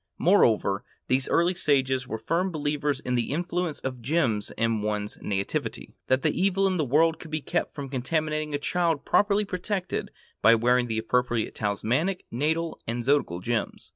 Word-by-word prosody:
Moreover, 115 - +3 0.3
these 130 +1 +2
early 170 +2 +3
sages 135 -6 +1
were 110 - -3
firm 165 - 0
believers 145 -3 -1
in 125 - -2
the 120 -2 0
influence 175 0 -2
of 130 -2 -4
gems 120 -6 0
in 115 -1 +1
one's 105 0 -3
nativity,—that 105 +6 -2
the - - +1
evil 195 0 +2
in 190 -1 +1
the 155 - +1
world 160 +5 +3
could 165 - -10
be 155 0 -1
kept - - -2
from 140 -2 -5
contaminating 150 +3 -1
a - - +2
child 165 0 0
properly 205 0 +3
protected 190 0 -3 0.3
by 115 +1 +7
wearing 125 +2 +2
the 110 -1 -2
appropriate 120 0 0
talismanic, 125 - -1
natal, 160 +6 -1
and 120 +1 -2
zodiacal 130 -10 +1
gems. 115 +2 -2
140 Hz, 165 wpm, -26 LUFS, 120-165 Hz, 0.3 s, by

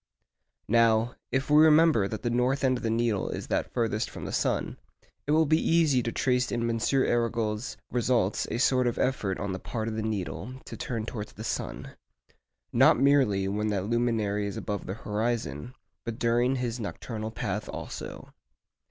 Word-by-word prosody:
Now, 115 +1 +3 0.2
if 135 +1 0
we 150 +1 +7
remember 155 -9 +5
that 110 - -6
the 120 - 0
north 125 +3 +1
end 130 -1 +3
of - - -11
the 115 - 0
needle 115 -3 0
is - - -4
that - - -1
farthest 115 -2 -1
from - - -8
the - - -4
sun, - - -1 0.5
it - - +1
will 160 +1 +4
be 155 +2 +3
easy 160 -6 +3
to 115 - -2
trace 125 0 +1
in 120 -1 0
M. 115 -1 -1
Arago's 115 -4 0
results 120 -5 +1
a - - -2
sort 125 0 +3
of 120 - -1
effort 105 -8 0
on 100 0 -3
the 95 - -4
part 110 +3 -4
of 110 - -3
the 110 - -2
needle 110 +3 -4
to - - -8
turn 115 -6 -4
towards 105 -2 -6
the 110 - -8
sun—not - - -1
merely 130 -9 +3
when 105 +2 -1
that 100 -3 -1
luminary 110 -3 0
is 100 - -5
above 105 -2 -4
the 95 - -3
horizon, 110 - -3 0.3
but 115 -1 -5
during 120 +2 +2
his 125 -2 -2
nocturnal 110 0 -5
path 105 -1 -4
also. - - -7
115 Hz, 180 wpm, -28 LUFS, 105-125 Hz, 0.5 s, we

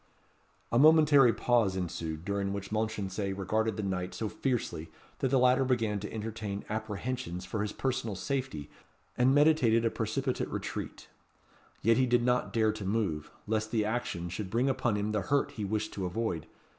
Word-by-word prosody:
A 115 - +3
momentary 150 -4 +7
pause 115 -3 +2
ensued, 85 -3 -4
during 100 -1 -1
which 100 0 -5
Mounchensey 105 -3 -2
regarded 110 +3 -1
the 105 - -2
knight 90 -2 -3
so 110 - -2
fiercely, 115 - -2 0.3
that - - +1
the 135 +1 +2
latter 125 +1 +4
began 115 -5 0
to 105 - -6
entertain 110 -2 -5
apprehensions 110 -3 -4
for 100 +3 -3
his 105 -1 -2
personal 130 -5 -2
safety, 130 - -3 0.5
and 130 +2 +4
meditated 140 -7 +4
a 115 - +2
precipitate 125 +4 -2
retreat. - - -5 0.8
Yet 115 +1 +4
he 130 0 +3
did 120 -1 +3
not 125 0 +1
dare 110 -2 +2
to 110 -1 -7
move, 95 -7 -1 0.2
lest 110 0 -1
the 110 -2 +1
action 105 -6 -2
should 95 +2 -5
bring 120 +6 +1
upon 125 -4 +1
him 105 +1 -1
the 105 -1 0
hurt 140 +5 +1
he 105 - -5
wished 105 +2 -2
to 95 -2 -2
avoid. 90 -4 -2
110 Hz, 170 wpm, -30 LUFS, 100-125 Hz, 0.8 s, momentary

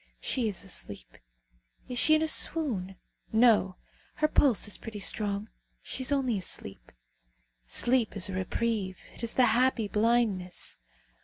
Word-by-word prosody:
She 250 -4 -1
is 205 - -3
asleep. 100 - -6 0.7
Is 245 -1 0
she 310 - +6
in 310 - +1
a - - 0
swoon? 230 - +1 0.4
No. 220 -5 +4 0.4
Her 305 - +2
pulse 275 -8 +3
is 205 - -2
pretty 220 -2 -8
strong. 205 0 -2 0.4
She - - -6
is 260 +2 +1
only 255 -7 +1
asleep. 100 - -4 0.8
Sleep 235 - +1
is 200 +2 +1
a 195 - -6
reprieve. 190 +1 -2 0.2
It - - -9
is 235 -1 -1
the 255 - +5
happy 240 -1 +2
blindness. 210 - 0
220 Hz, 145 wpm, -29 LUFS, 195-250 Hz, 0.8 s, she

